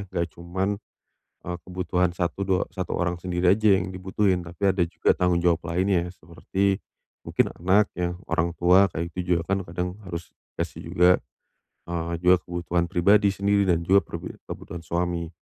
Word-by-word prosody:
nggak 85 -2 -1
cuman, 95 +4 -3 0.7
eee, 90 0 -3
kebutuhan 90 -1 0
satu 90 +2 -1
dua 95 -1 +1
1 95 -1 -3
orang 90 -1 0
sendiri 90 0 -1
aja 105 -3 +4
yang 90 +1 -4
dibutuhin, 95 0 0
tapi 90 +3 0
ada 90 - +2
juga 85 0 +1
tanggung 90 -1 +2
jawab 85 -1 +2
lainnya, 90 0 +1
seperti 95 +3 -2 0.4
mungkin - - +1
anak 100 +3 +4
ya, 90 0 -1 0.2
orang 85 +1 +1
tua, 90 +3 +5
kayak 85 +1 -3
gitu 90 -1 +1
juga 85 - -3
kan 95 - -2
kadang 90 +1 -4
harus 85 -2 -6 0.3
kasih - - -5
juga, 90 +1 +5 0.8
eee, 85 -1 -3
juga 90 +1 +7
kebutuhan 85 0 -2
pribadi 100 +4 +4
sendiri 100 0 +2
dan 85 -1 +2
juga 95 +3 +5
pri - - -7 0.2
kebutuhan 85 - -7
suami, 85 0 -2
90 Hz, 165 wpm, -25 LUFS, 85-95 Hz, 0.8 s, juga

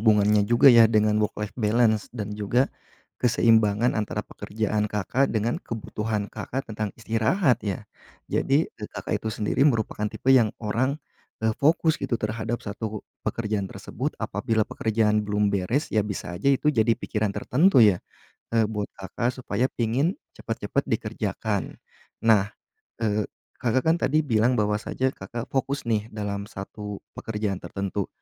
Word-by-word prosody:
hubungannya 105 -1 +4
juga 120 +2 +7
ya 115 -1 +8
dengan 105 -1 +3
work 105 - -1
life 105 -1 -4
balance 110 -1 +2
dan 105 -1 -4
juga 105 +5 +1 0.6
keseimbangan 115 -1 +3
antara 105 -1 -2
pekerjaan 105 0 -2
Kakak 105 +7 0
dengan 115 +2 -1
kebutuhan 110 -2 -3
Kakak 135 +2 -4
tentang 110 -1 -3
istirahat 115 - +1
ya. 100 -3 -3 0.5
Jadi 140 +4 +2
e - - -17
Kakak 105 - -3
itu 110 - -3
sendiri 105 +3 -1
merupakan 110 -3 -1
tipe 130 +5 +1
yang 120 -5 +6 0.2
orang, 130 +7 0 0.5
eee, 110 - +3
fokus 160 +2 +3
gitu 120 - 0
terhadap 110 +2 -3
1 105 +1 -5 0.2
pekerjaan 105 -4 -2
tersebut - - -5
apabila 110 -1 0
pekerjaan 105 -1 +1
belum 105 -1 0
beres 110 +10 0
ya 110 - +3
bisa 100 -3 -4
aja 140 - +2
itu 150 +2 +3
jadi 115 -1 +3
pikiran 105 -1 -1
tertentu 135 - +5
ya, 95 -4 +4 0.5
eee, 115 -2 +3
buat 105 -2 -4
Kakak, 120 +6 -3
supaya 125 +1 -1
pingin 125 - 0 0.2
cepet-cepet - - -2
dikerjakan. - - -2 0.5
Nah, 105 -2 +4 0.5
eee, 105 -1 0 0.3
Kakak 125 +1 +1
kan 160 +1 +4
tadi 155 +3 +2
bilang 120 0 +2
bahwasanya 105 +5 0
Kakak 120 -1 -6
fokus 135 0 -1
nih 110 -2 0
dalam 105 -1 -4
1 105 0 -7 0.2
pekerjaan 105 -4 -3
tertentu, 100 0 -3
110 Hz, 145 wpm, -25 LUFS, 105-120 Hz, 0.6 s, ya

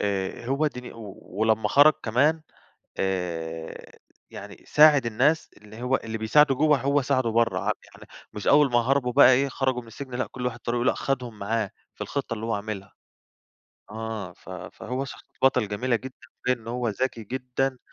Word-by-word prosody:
آآ 100 +3 -2
هو 140 +4 +1
ديني 125 -4 -6
أوي. 105 -4 -10
ولما 110 +3 0
خرج 145 +2 +7
كمان، 145 +8 +2 0.6
آآ 85 -4 -4 0.3
يعني - - -10
ساعِد 150 -5 +6
الناس 140 +8 +1
اللي 105 +2 -12
هو 125 +1 +2
اللي 110 -2 -5
بيساعده 135 +6 +4
جوّه 150 +1 +3
هو 140 +1 +2
ساعده 130 -3 +1
برّه. 115 0 +2
ع - - -5 0.2
يعني - - -16 0.3
مش 105 - -7
أول 145 -2 +5
ما 120 - +5
هربوا 125 0 +1
بقى 130 -1 +7
إيه، 135 +2 +3
خرجوا 130 -2 -1
من - - -17
السجن، 130 +2 -8
لأ 125 - -1
كل 125 -1 -5
واحد 125 -1 -3
طريقه، 120 +1 -1
لأ، - - +4
أخدهم 125 -5 -3
معاه 110 0 -1 0.2
في - - -31
الخطة 135 -4 -3
اللي 110 +1 -5
هو 115 - 0
عاملها. 100 -1 -5 1.0
آه 110 -4 -5
ف - - -15
فهو 130 +4 -5
شخصية 135 - -12
بطل 125 -5 +3
جميلة 120 +4 0
جدًا، 130 +2 -9 0.3
تبين 125 0 +1
إن 115 - -10
هو 120 0 -1
ذكي 115 +1 -2
جدًا. 130 +2 -2
125 Hz, 180 wpm, -25 LUFS, 110-135 Hz, 1.0 s, خرج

